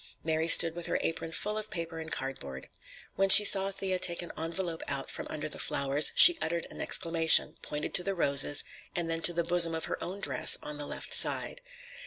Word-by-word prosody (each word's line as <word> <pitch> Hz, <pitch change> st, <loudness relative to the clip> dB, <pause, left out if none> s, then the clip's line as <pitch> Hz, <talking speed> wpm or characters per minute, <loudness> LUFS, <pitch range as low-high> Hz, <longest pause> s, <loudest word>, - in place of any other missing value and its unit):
Mary 160 Hz, 0 st, -3 dB
stood 165 Hz, -1 st, +6 dB
with 175 Hz, -1 st, -5 dB
her -, -, -3 dB
apron 165 Hz, 0 st, -6 dB
full 210 Hz, +5 st, -5 dB
of 215 Hz, 0 st, -10 dB
paper 165 Hz, -3 st, -8 dB
and 160 Hz, 0 st, -10 dB
cardboard. 70 Hz, -, -7 dB, 0.5 s
When 195 Hz, 0 st, -2 dB
she 210 Hz, +2 st, +9 dB
saw 195 Hz, -1 st, +2 dB
Thea 190 Hz, -1 st, -5 dB
take 175 Hz, 0 st, 0 dB
an 175 Hz, -, -10 dB
envelope 165 Hz, +1 st, -6 dB
out 135 Hz, -, -5 dB
from -, -, -9 dB
under 155 Hz, 0 st, -6 dB
the -, -, -7 dB
flowers, 140 Hz, +2 st, +2 dB
she 350 Hz, -2 st, +8 dB
uttered 170 Hz, +1 st, -5 dB
an -, -, -10 dB
exclamation, 165 Hz, -1 st, +2 dB
pointed 150 Hz, 0 st, -8 dB
to 180 Hz, -, +1 dB
the 195 Hz, 0 st, -5 dB
roses, 140 Hz, -3 st, +2 dB, 0.3 s
and 175 Hz, -1 st, -4 dB
then 165 Hz, 0 st, -5 dB
to 175 Hz, -, +3 dB
the 170 Hz, 0 st, -4 dB
bosom 170 Hz, -1 st, +2 dB
of 160 Hz, -, -6 dB
her -, -, -8 dB
own 190 Hz, +3 st, -9 dB
dress, -, -, +1 dB
on 150 Hz, 0 st, -8 dB
the 145 Hz, -, -6 dB
left -, -, -7 dB
side. -, -, +1 dB
165 Hz, 215 wpm, -27 LUFS, 155-180 Hz, 0.5 s, she